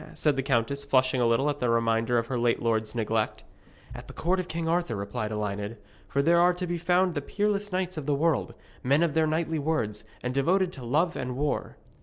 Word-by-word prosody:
said 150 -2 +2
the 135 - 0
countess, 135 +1 0
flushing 130 -2 +2
a 120 - +4
little 115 +5 +2
at 145 -1 -1
the 125 - 0
reminder 115 +1 +2
of 115 - +1
her 125 0 -2
late 120 0 +2
lord's 110 -1 -1
neglect. 110 -1 -1 0.5
'At - - -9
the - - -11
court 185 +3 +1
of 180 - -3
King 165 -1 -3
Arthur,' 170 -8 0
replied 105 +2 -3
Elined; 105 +1 -3 0.3
'for 140 - 0
there 170 +3 +4
are 175 +1 +4
to 180 0 -3
be 175 -1 -3
found 180 +1 +2
the 145 - -2
peerless 205 +5 -1
knights 185 -1 -2
of 150 -2 -5
the 145 - +2
world, 160 +1 0 0.3
men 140 +5 +3
of 165 -4 +1
their 160 0 +3
knightly 160 0 0
words, 125 -9 -1 0.2
and 125 0 -2
devoted 180 +7 +2
to 130 - -9
love 155 +9 +1
and 125 0 -4
war. 145 +1 -2
140 Hz, 225 wpm, -27 LUFS, 115-170 Hz, 0.5 s, a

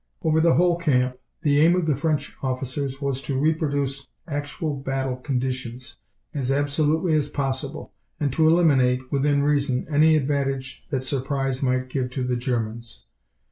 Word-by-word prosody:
Over 160 -1 +3
the 165 0 +4
whole 175 0 +3
camp, 125 -6 +1 0.3
the 145 -2 +3
aim 170 +3 +5
of 180 -2 0
the 150 -3 +2
French 150 +1 -1
officers 135 +1 -3
was 135 -1 -1
to 135 -1 -3
reproduce 145 -3 0 0.2
actual 145 0 -3
battle 135 -1 -2
conditions 130 -2 -4 0.4
as 135 -3 -1
absolutely 150 +4 +1
as 150 -2 +1
possible, 135 +1 -3 0.3
and 145 -3 0
to 160 -1 +3
eliminate, 130 -6 +3
within 140 0 +2
reason, 140 -3 +1
any 155 +2 +5
advantage 135 -2 -2
that 130 -2 -1
surprise 135 0 -1
might 130 -1 0
give 130 -1 -2
to 130 +1 -3
the 125 0 0
Germans. 115 -2 -3
140 Hz, 150 wpm, -24 LUFS, 130-150 Hz, 0.4 s, aim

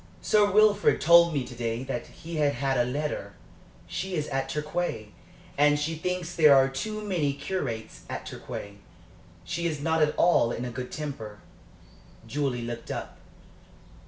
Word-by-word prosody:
"Sir 210 -1 +4
Wilfrid 210 0 +4
told 170 +1 +7
me 140 -5 -1
to - - -9
day 115 +1 -3
that 125 -3 -4
he 165 0 -8
had 145 -2 +2
had 135 +1 0
a 120 -1 +1
letter. 150 +3 -3 0.5
She 190 0 -4
is 150 -2 -1
at 135 0 -2
Torquay, 150 -8 -3 0.5
and 145 0 +5
she 150 +2 -1
thinks 175 +1 -3
there 150 -4 +7
are 135 0 +6
too 215 +11 -4
many 170 -9 0
curates 140 -7 -4
at - - -5
Torquay. 100 0 -7 0.7
She 170 0 -2
is 155 -3 -3
not 160 +2 +1
at 150 0 +2
all 145 -9 +4
in 120 - -3
a 125 - -4
good 125 +2 -6
temper." 125 -9 -6 0.9
Julie 130 -1 -2
looked 115 0 -6
up. - - -6
150 Hz, 160 wpm, -27 LUFS, 125-170 Hz, 0.9 s, told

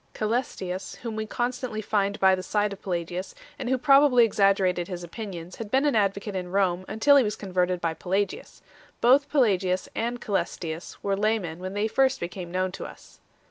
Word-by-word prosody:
Cselestius, 210 -5 -2
whom 230 -2 -4
we 220 0 -3
constantly 245 -1 -3
find 205 -1 0
by 190 0 +5
the 185 - 0
side 205 +2 0
of 195 - -12
Pelagius, 175 - -4 0.2
and 245 - -3
who 260 - +2
probably 275 -2 +6
exaggerated 195 -4 +2
his 180 -2 -6
opinions, 180 -2 -7
had 225 -2 -6
been 265 +5 +2
an 290 - +2
advocate 200 -1 0
in 180 -1 -3
Rome 185 -1 +1
until 285 +6 +4
he 270 - +5
was 210 -1 -2
converted 180 -3 -1
by 165 -1 -1
Pelagius. 190 +4 -3 0.4
Both 275 +4 +4
Pelagius 190 -9 +2
and 240 +2 -2
Ca?lestius 170 -6 -3
were 200 -1 +1
laymen 200 -5 -1
when 185 +2 -6
they 210 +1 +1
first 265 +3 +2
become 175 0 -6
known 185 +1 0
to 190 - -7
us. - - -13
200 Hz, 180 wpm, -26 LUFS, 185-230 Hz, 0.4 s, probably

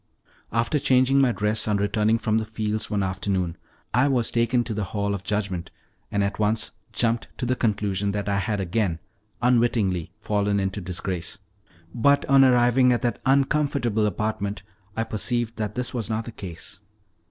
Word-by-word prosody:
After 115 +6 +1
changing 130 +1 +4
my 130 -2 +4
dress 105 0 0
on 105 -1 +2
returning 105 +2 +2
from 110 -1 +1
the - - -2
fields 110 0 -2
one 105 -2 0
afternoon, 95 -2 -1 0.4
I 125 +4 +4
was 125 -5 +1
taken 120 +1 +2
to 115 -1 -4
the 105 -1 -2
hall 100 +1 -2
of 100 -1 -4
judgment, 100 -5 -2 0.4
and 100 0 +1
at 100 +1 -2
once 110 +1 +1 0.2
jumped 115 -1 0
to - - -2
the 130 +1 +1
conclusion 105 -3 0
that 100 -1 -3
I 100 -1 +1
had 105 +1 -1
again 95 -2 0 0.5
unwittingly 115 -8 +2
fallen 100 -1 0
into 95 +1 -2
disgrace; 90 +1 -4 0.6
but 140 +5 +3
on 135 0 +6
arriving 125 0 +5
at 120 +1 0
that 120 - -1
uncomfortable 135 -5 +2
apartment 105 0 -2 0.3
I 115 - +1
perceived 115 +1 -1
that 105 -1 -3
this 125 0 -2
was 120 -4 -2
not 110 0 -2
the 120 - -7
case. 95 0 -9
110 Hz, 170 wpm, -25 LUFS, 100-120 Hz, 0.6 s, on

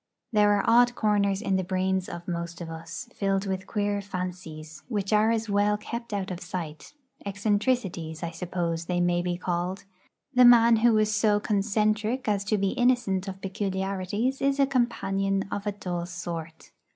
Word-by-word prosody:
There 210 -1 +5
are 200 - 0
odd 240 +1 +5
corners 205 -2 +1
in 190 -2 +1
the 190 - 0
brains 185 0 -1
of 170 0 -8
most 170 -1 -4
of 165 -2 -6
us, 165 +8 -7
filled 195 0 0
with 190 0 -3
queer 205 -1 -1
fancies 180 -5 -6
which 210 -4 -2
are 215 +1 +4
as 225 -1 0
well 205 0 +2
kept 235 +2 -6
out 195 -2 -2
of 175 - -4
sight; 175 - -7 0.3
eccentricities, 200 -5 -1
I 170 - -3
suppose 170 -1 -3
they 175 0 -1
may 175 0 +2
be 175 0 -2
called. 180 +1 -2 0.5
The 250 -1 +6
man 235 -1 +7
who 225 0 +4
is 215 0 +2
so 210 -1 +3
'concentric' 215 +4 0
as 205 -2 +1
to 215 +1 +1
be 195 -1 +1
innocent 240 -6 +1
of 190 0 -6
peculiarities 195 +5 -2
is 275 0 +1
a 275 - +6
companion 195 -7 0
of 205 +1 -3
a - - +1
dull 175 -3 -4
sort. 170 -2 -7
195 Hz, 175 wpm, -27 LUFS, 180-215 Hz, 0.5 s, man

